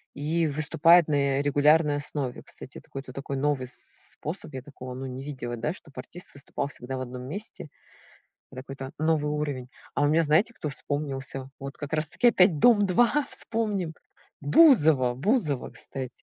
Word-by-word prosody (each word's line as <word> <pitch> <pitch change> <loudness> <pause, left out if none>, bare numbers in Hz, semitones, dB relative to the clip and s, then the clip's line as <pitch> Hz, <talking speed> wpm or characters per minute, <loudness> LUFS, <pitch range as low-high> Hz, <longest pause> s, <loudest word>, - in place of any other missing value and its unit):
и 160 +3 0
выступают 155 +3 +4
на, 150 - +1 0.2
э, - - +2
регулярной 145 +1 +4
основе. 145 -3 -4
Кстати, - - -11
это - - -12
какой-то 135 -2 -8
такой 140 +1 -5
новый 135 -1 0
с 125 - -5
способ. 160 -1 -6
Я 130 - -5
такого 130 -2 -9
ну 130 +1 -6
не 130 +1 -6
видела, 130 -4 -5
да, 150 +9 -1
чтобы 145 -6 -16
артист 175 +7 -8
выступал 140 0 -4
всегда 130 -1 -6
в - - -4
одном 125 0 -6
месте. 170 +1 -6 0.8
Это 130 - -7
какой-то 135 0 -8
новый 155 -1 +1
уровень. 145 -4 -3 0.3
А 145 - +2
у 145 - +4
меня 160 +2 +4
знаете 160 +10 +3
кто 150 - -4
вспомнился? 135 -2 -4
Вот 135 0 -7
как 145 -1 -7
раз 155 0 +1
таки 245 - +2
опять 180 -7 +4
"Дом-2" 235 - +4
вспомним. 205 -7 -1 0.5
Бузова, 150 - +5
Бузова, 150 - 0
кстати. 130 -2 -8
145 Hz, 170 wpm, -27 LUFS, 135-160 Hz, 0.8 s, Бузова